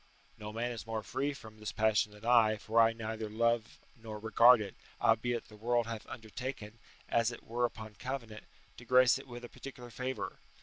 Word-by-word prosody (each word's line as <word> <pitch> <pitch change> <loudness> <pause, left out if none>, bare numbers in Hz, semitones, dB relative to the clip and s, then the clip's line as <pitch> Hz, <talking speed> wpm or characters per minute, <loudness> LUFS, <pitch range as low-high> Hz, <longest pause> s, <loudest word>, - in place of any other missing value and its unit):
["No 105 -3 -7
man 120 +3 -2
is 115 -1 -7
more 110 -1 -3
free 140 +2 -1
from 110 -6 -11
this 105 - -4
passion 110 -1 +2
than 105 +2 -13
I, 115 -3 +5
for 110 +2 +3
I 115 0 +6
neither 110 -1 -4
love 115 +1 +1 0.2
nor 110 -2 -8
regard 115 +3 +6
it: 105 -2 -5 0.3
albeit 115 +1 +2
the 105 - -14
world 120 +2 +1
hath 115 -1 -6
undertaken, 115 -1 -6 0.3
as 115 0 +2
it 120 - -10
were 120 +2 0
upon 110 -2 -6
covenant, 115 -2 -6 0.3
to 120 - -11
grace 125 +1 +5
it 135 - -12
with 120 -1 -8
a - - -7
particular 125 -3 -10
favour. 125 -1 -4
115 Hz, 190 wpm, -33 LUFS, 110-120 Hz, 0.3 s, I